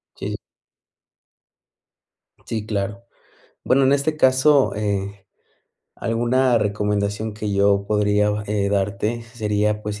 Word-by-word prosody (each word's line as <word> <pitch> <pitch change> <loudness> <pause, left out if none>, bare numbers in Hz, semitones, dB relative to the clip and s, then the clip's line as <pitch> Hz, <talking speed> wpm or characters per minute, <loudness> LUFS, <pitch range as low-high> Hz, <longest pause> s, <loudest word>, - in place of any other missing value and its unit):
Sí, - - -5
sí. - - -4 2.1
Sí, 110 -2 -4
claro. 100 0 -3 0.6
Bueno, 135 +1 +3
en 135 - +4
este 145 +2 0
caso, 135 0 +4
eh, 100 -1 -3 0.7
alguna 120 +2 +1
recomendación 105 +1 -1
que 105 -1 -4
yo 100 0 +2
podría 105 0 +2
va 105 0 -2
eh, 100 -1 0
darte 100 +3 -1
sería, 105 -2 -1
pues, 105 0 -5
105 Hz, 115 wpm, -21 LUFS, 100-115 Hz, 2.1 s, en